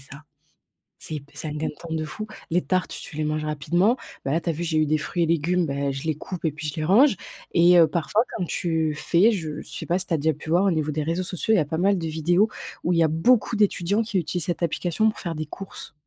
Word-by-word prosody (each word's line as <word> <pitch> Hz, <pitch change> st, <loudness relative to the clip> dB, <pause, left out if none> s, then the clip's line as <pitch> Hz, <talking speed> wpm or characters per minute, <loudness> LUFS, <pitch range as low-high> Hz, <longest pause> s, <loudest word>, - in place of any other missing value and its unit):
ça. 140 Hz, +2 st, -12 dB, 0.8 s
C'est -, -, -7 dB
hyp 145 Hz, -1 st, -9 dB
c'est 155 Hz, -, -6 dB
un -, -, -5 dB
gain 155 Hz, +1 st, -2 dB
de -, -, -4 dB
temps 165 Hz, -1 st, -6 dB
de 155 Hz, -, -1 dB
fou. 215 Hz, +8 st, -6 dB, 0.2 s
Les 175 Hz, +2 st, +3 dB
tartes, 185 Hz, -1 st, -1 dB
tu -, -, -8 dB
les 155 Hz, -, 0 dB
manges 155 Hz, 0 st, -1 dB
rapidement. 175 Hz, -, +2 dB, 0.3 s
Bah 135 Hz, -, 0 dB
là, 165 Hz, -, +1 dB
tu 170 Hz, -, -3 dB
as -, -, +1 dB
vu, 170 Hz, -, -4 dB
j'ai 160 Hz, -1 st, 0 dB
eu 155 Hz, -, +3 dB
des 155 Hz, +1 st, +2 dB
fruits 170 Hz, +2 st, -1 dB
et -, -, +1 dB
légumes. 170 Hz, +2 st, +1 dB
Bah, 140 Hz, -1 st, -1 dB
je 135 Hz, 0 st, -5 dB
les 155 Hz, -, 0 dB
coupe 175 Hz, +4 st, -7 dB
et 160 Hz, -, +2 dB
puis 150 Hz, +1 st, -6 dB
je 145 Hz, -, -4 dB
les 155 Hz, -, -2 dB
range 235 Hz, -, +5 dB, 0.4 s
et 175 Hz, 0 st, +6 dB
heu, 165 Hz, -, +7 dB
parfois, 180 Hz, +8 st, +1 dB
comme 185 Hz, -, -1 dB
tu 160 Hz, -3 st, 0 dB
fais. 180 Hz, +9 st, +3 dB
Je 160 Hz, -7 st, -4 dB
sais -, -, -7 dB
pas 175 Hz, +1 st, +1 dB
si 185 Hz, -, -2 dB
tu -, -, -2 dB
as -, -, 0 dB
déjà 160 Hz, +2 st, +1 dB
pu 150 Hz, +2 st, -10 dB
voir, 175 Hz, +4 st, +3 dB
au 195 Hz, -, +3 dB
niveau 155 Hz, -2 st, 0 dB
des 150 Hz, 0 st, -2 dB
réseaux 170 Hz, +4 st, -1 dB
sociaux, 190 Hz, +4 st, -1 dB
il -, -, +5 dB
y -, -, +4 dB
a -, -, -1 dB
pas 160 Hz, +3 st, -3 dB
mal 195 Hz, +3 st, +3 dB
de 165 Hz, -, -3 dB
vidéos 175 Hz, +7 st, +2 dB, 0.3 s
où 175 Hz, -, +1 dB
il 170 Hz, -, +2 dB
y -, -, +6 dB
a -, -, +4 dB
beaucoup 220 Hz, +9 st, +3 dB
d'étudiants 200 Hz, 0 st, +2 dB
qui 210 Hz, -3 st, -2 dB
utilisent 175 Hz, 0 st, -3 dB
cette 175 Hz, 0 st, -2 dB
application 175 Hz, +6 st, +1 dB
pour 215 Hz, -, -6 dB
faire 170 Hz, -3 st, -4 dB
des 155 Hz, -, -3 dB
courses. 195 Hz, -2 st, -9 dB
165 Hz, 290 wpm, -24 LUFS, 155-185 Hz, 0.8 s, heu